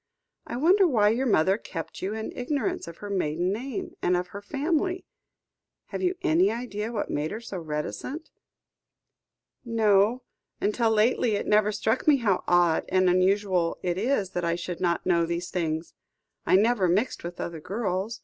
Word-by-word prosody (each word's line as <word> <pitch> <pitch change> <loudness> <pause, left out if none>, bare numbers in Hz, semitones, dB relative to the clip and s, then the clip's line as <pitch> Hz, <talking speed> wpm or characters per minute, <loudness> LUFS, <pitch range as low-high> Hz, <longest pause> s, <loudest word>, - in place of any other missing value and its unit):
"I - - -4
wonder 365 +7 +5
why 215 -8 +3
your 250 +5 0
mother 190 0 +3
kept 165 -7 -7
you 195 +3 -2
in 220 0 -4
ignorance 250 - -2
of 170 - -9
her - - -6
maiden 180 0 0
name, 245 +2 -5
and 180 0 +2
of 180 0 -3
her 200 - -8
family? 320 - -1 0.8
Have - - -4
you 365 0 +1
any 345 +2 +4
idea 230 -2 -4
what 220 -3 -3
made 150 +2 -1
her 215 - -5
so 215 -5 -6
reticent? 160 - -5 1.3
"No; 225 0 +2 0.4
until 225 +3 +1
lately 220 +1 +2
it - - -2
never 210 0 +3
struck 220 +5 -1
me 295 -2 +6
how 210 -7 +1
odd 175 -2 +3
and 185 -1 +3
unusual 185 -1 +2
it 180 0 -1
is 210 -4 0
that 180 - -3
I 170 0 +1
should 175 0 -5
not 170 -2 0
know 170 -2 +2
these 170 +1 -3
things. 160 -2 -2 0.5
I - - +5
never 210 -1 +3
mixed 205 +9 0
with 175 0 -7
other 170 -2 -4
girls. 200 +3 -3
205 Hz, 170 wpm, -26 LUFS, 180-235 Hz, 1.3 s, me